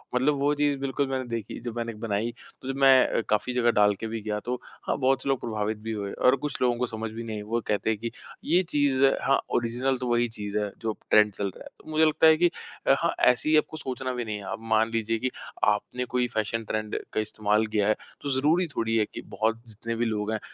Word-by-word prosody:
मतलब 140 +4 +3
वो 145 +1 +2
चीज़ 145 -1 +1
बिल्कुल 140 +1 -1
मैंने 130 -1 -2
देखी 115 -3 -4
जो 120 -1 -5
मैंने 115 -1 -3
बनाई 110 +1 -2 0.3
तो - - -9
जब 135 - -6
मैं 130 -3 +5
काफ़ी 105 +4 +1
जगह 120 -1 +3
डाल 105 -1 +4
के 115 - -3
भी 110 0 -4
गया 105 0 -2
तो 125 +1 -2 0.3
हाँ, - - 0
बहुत 135 -1 +2
से - - -2
लोग 135 -2 +2
प्रभावित 110 -1 -2
भी 110 +1 -6
हुए 100 -2 -3
और 125 +1 +4
कुछ 145 +1 -4
लोगों 125 -1 +2
को 125 - 0
समझ 110 -1 -5
भी 115 +1 -6
नहीं 110 -1 -5
आई - - -5
वो 115 +3 -2
कहते 105 +1 0
हैं 110 -2 0
कि 115 0 -4 0.3
ये 180 - +3
चीज़ 140 -2 +3 0.2
हाँ, 135 - +3 0.2
ओरिज़िनल 120 +3 0
तो 125 0 -4
वहीं 120 0 +2
चीज़ 105 -2 -4
है 105 -1 -1
जो 110 -1 -1 0.2
ट्रेंड 105 -1 +6
चल 100 - -3
रहा - - -11
है। - - -11
तो - - -13
मुझे 155 +1 +4
लगता 155 +1 +4
है 160 0 +7
कि 175 - +5 0.4
अ, - - +7
हाँ, - - +1
ऐसी 125 +5 +3
ही 155 - +6
आपको 155 +1 0
सोचना 130 -2 -4
भी 120 -1 -3
नहीं 110 -1 -3
है 100 - -9
आप - - -4
मान 110 +1 +3
लीजिए 115 0 0
कि 130 - 0 0.3
आपने 105 +4 +1
कोई 125 -1 +3
फ़ैशन 115 0 -2
ट्रेंड 110 0 -2
का - - +1
इस्तेमाल 110 0 0
किया 105 -1 +1
है 110 - +3 0.3
तो 145 - -3
ज़रूरी 165 +6 +3
थोड़ी 115 0 0
है 110 - +3
कि - - -6
बहुत 115 +1 -1
जितने 115 +1 -5
भी 120 +1 0
लोग 105 -1 -1
हैं 110 - -1
115 Hz, 255 wpm, -27 LUFS, 110-130 Hz, 0.4 s, है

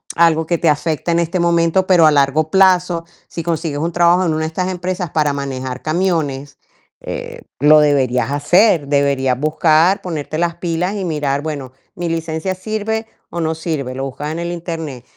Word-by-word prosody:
algo 160 -1 +3
que 170 0 -1
te 165 - +2
afecta 155 +2 -1
en 170 - +2
este 170 +2 -1
momento. 170 +2 +2
Pero 175 -4 +5
a 155 - +6
largo 145 +2 +2
plazo, 180 -3 +3 0.2
si 165 - -6
consigues 160 -3 -2
un 170 +2 -1
trabajo 175 +2 +3
en 160 - +1
una 160 - -1
de - - -1
estas 180 +3 -3
empresas 180 -1 -3
para 150 -2 +1
manejar 130 -2 -5
camiones, 155 -5 -2 0.4
eh, - - -7 0.2
lo 150 +2 +6
deberías 135 -4 +2
hacer. 165 +2 +3
Deberías 140 -3 +1
buscar, 155 +4 +3
ponerte 155 -3 -4
las 170 0 0
pilas 175 +3 -2
y 195 -2 -3
mirar: 145 -3 -1
"Bueno, 145 -5 -5 0.2
¿mi 175 -1 -3
licencia 165 +2 -2
sirve 220 +3 -3 0.2
o 170 - -3
no 160 0 -1
sirve?". 150 -6 -4
Lo 135 - -4
buscas 145 +3 -5
en 160 - -4
el 170 0 -3
Internet. 165 -7 -6
160 Hz, 180 wpm, -17 LUFS, 145-175 Hz, 0.4 s, a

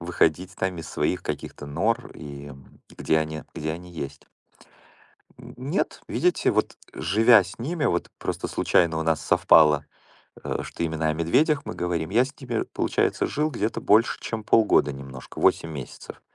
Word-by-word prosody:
выходить 90 +1 0
там 95 -2 -2
из 80 - -7
своих - - -1
каких-то 75 - -6
нор 85 +11 -1
и, 70 -1 -9
м, 70 -2 -14 0.2
где 80 - +1
они, 80 0 -3
где 80 -1 -3
они 90 +2 -9
есть. 70 -4 -7 1.1
Нет, 140 +10 -3
видите? 180 0 +1
Вот, - - 0 0.2
живя 110 +5 +5
с 95 +4 -10
ними, 150 +5 -2
вот - - 0
просто - - -3
случайно 85 -2 +2
у 80 - 0
нас 80 -1 +1
совпало, 75 -2 +5 0.8
что, - - -6
э, 85 - +2
именно 80 0 -1
о - - +2
медведях 140 - +2
мы - - -5
говорим. 85 -1 -2
Я 120 +5 +4
с 135 - -8
ними, 120 -3 -2
получается, - - 0
жил 155 +1 -1
где-то 115 -4 -2
больше 110 +3 +3
чем 110 -1 -5
полгода 105 -11 +4
немножко, 70 -1 -10
8 85 - +3
месяцев. 70 -5 -9
85 Hz, 160 wpm, -25 LUFS, 80-115 Hz, 1.1 s, живя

